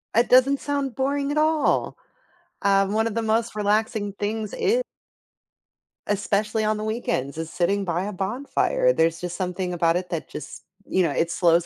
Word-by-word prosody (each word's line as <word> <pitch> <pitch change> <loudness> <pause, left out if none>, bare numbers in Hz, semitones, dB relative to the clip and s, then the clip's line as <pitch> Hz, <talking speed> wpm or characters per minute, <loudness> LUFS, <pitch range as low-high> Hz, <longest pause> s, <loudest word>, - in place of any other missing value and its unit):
It 235 +2 +3
doesn't 265 +2 +5
sound 280 -4 -2
boring 280 +1 0
at 295 - -2
all. 310 0 +2 0.6
Um, 195 0 +3
one 220 +1 +2
of 225 - -4
the 230 - +1
most 225 +1 0
relaxing 210 0 0
things, 210 +1 -3
e 475 +5 +2 1.3
especially 210 +2 0
on 215 0 +2
the 210 - -4
weekends, 215 - -2
is 165 0 -4
sitting 195 +4 0
by 175 0 -1
a 205 - -3
bonfire. 275 - 0
There's 165 - +1
just 175 -1 -4
something 180 -1 -2
about 170 -1 +2
it 180 0 -2
that 165 -3 -4
just - - -8 0.2
you 190 - +1
know, 165 -4 +2
it 165 +4 0
slows 170 -1 +3
210 Hz, 175 wpm, -24 LUFS, 180-235 Hz, 1.3 s, doesn't